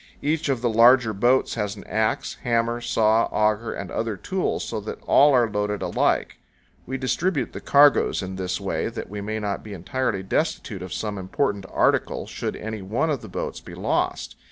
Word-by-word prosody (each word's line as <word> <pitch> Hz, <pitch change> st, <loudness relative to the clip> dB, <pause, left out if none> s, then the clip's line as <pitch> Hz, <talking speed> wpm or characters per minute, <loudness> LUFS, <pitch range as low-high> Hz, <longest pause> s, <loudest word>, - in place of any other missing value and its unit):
Each 155 Hz, +1 st, 0 dB
of 130 Hz, -4 st, 0 dB
the -, -, +3 dB
larger 115 Hz, 0 st, +6 dB
boats 120 Hz, +6 st, +2 dB
has 105 Hz, -2 st, -2 dB
an 100 Hz, -, -10 dB
axe, 110 Hz, 0 st, -1 dB
hammer, 120 Hz, -1 st, 0 dB
saw, 115 Hz, -1 st, +3 dB
auger, 105 Hz, +1 st, 0 dB
and -, -, -6 dB
other 110 Hz, -3 st, -2 dB
tools, 190 Hz, -, -2 dB
so 110 Hz, -, -4 dB
that 105 Hz, -, -6 dB
all 145 Hz, +1 st, +6 dB
are 120 Hz, -2 st, +4 dB
loaded 105 Hz, -1 st, -2 dB
alike. -, -, 0 dB, 0.5 s
We 135 Hz, +1 st, -3 dB
distribute 140 Hz, +3 st, -1 dB
the -, -, -7 dB
cargoes 145 Hz, -7 st, +4 dB
in 95 Hz, 0 st, -5 dB
this 90 Hz, -1 st, -2 dB
way -, -, -2 dB
that -, -, -7 dB
we 105 Hz, 0 st, -5 dB
may 110 Hz, +2 st, -3 dB
not 105 Hz, -2 st, -3 dB
be 105 Hz, -, -8 dB
entirely 100 Hz, +2 st, -2 dB
destitute 95 Hz, -, -2 dB
of 90 Hz, -1 st, -7 dB
some 105 Hz, -1 st, -3 dB
important 100 Hz, 0 st, -1 dB
article -, -, +1 dB
should -, -, -4 dB
any 110 Hz, -1 st, -5 dB
one 110 Hz, +12 st, 0 dB
of 140 Hz, -5 st, -2 dB
the 110 Hz, -, -10 dB
boats -, -, -4 dB
be -, -, -10 dB
lost. -, -, -1 dB
110 Hz, 190 wpm, -24 LUFS, 105-125 Hz, 0.5 s, larger